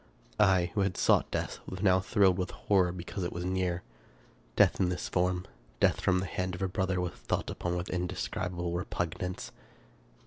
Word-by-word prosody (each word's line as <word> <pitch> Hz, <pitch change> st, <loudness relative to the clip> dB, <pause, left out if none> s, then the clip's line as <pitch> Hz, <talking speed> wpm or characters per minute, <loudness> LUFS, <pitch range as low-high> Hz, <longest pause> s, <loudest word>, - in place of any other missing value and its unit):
I, 95 Hz, -4 st, +4 dB
who 105 Hz, -, +1 dB
had 95 Hz, -2 st, 0 dB
sought -, -, +3 dB
death, -, -, -3 dB
was 95 Hz, +1 st, -5 dB
now 95 Hz, -2 st, +5 dB
thrilled 95 Hz, -1 st, +3 dB
with 90 Hz, -, -1 dB
horror 95 Hz, -3 st, +2 dB
because 90 Hz, +2 st, -5 dB
it 85 Hz, -, -2 dB
was 85 Hz, +1 st, -4 dB
near. 90 Hz, -1 st, -1 dB, 0.7 s
Death -, -, +4 dB
in 90 Hz, -, +3 dB
this 90 Hz, -, -3 dB
form, 90 Hz, 0 st, 0 dB, 0.3 s
death -, -, +3 dB
from 90 Hz, -, +3 dB
the -, -, -2 dB
hand 90 Hz, 0 st, -2 dB
of 90 Hz, -, -4 dB
a -, -, +2 dB
brother, 95 Hz, 0 st, 0 dB
was 90 Hz, -1 st, -1 dB
thought -, -, -2 dB
upon 90 Hz, 0 st, -2 dB
with 90 Hz, -, -4 dB
inde 90 Hz, 0 st, -1 dB
scribable 90 Hz, -1 st, -3 dB
repugnance. 90 Hz, 0 st, -3 dB
90 Hz, 185 wpm, -30 LUFS, 90-95 Hz, 0.7 s, now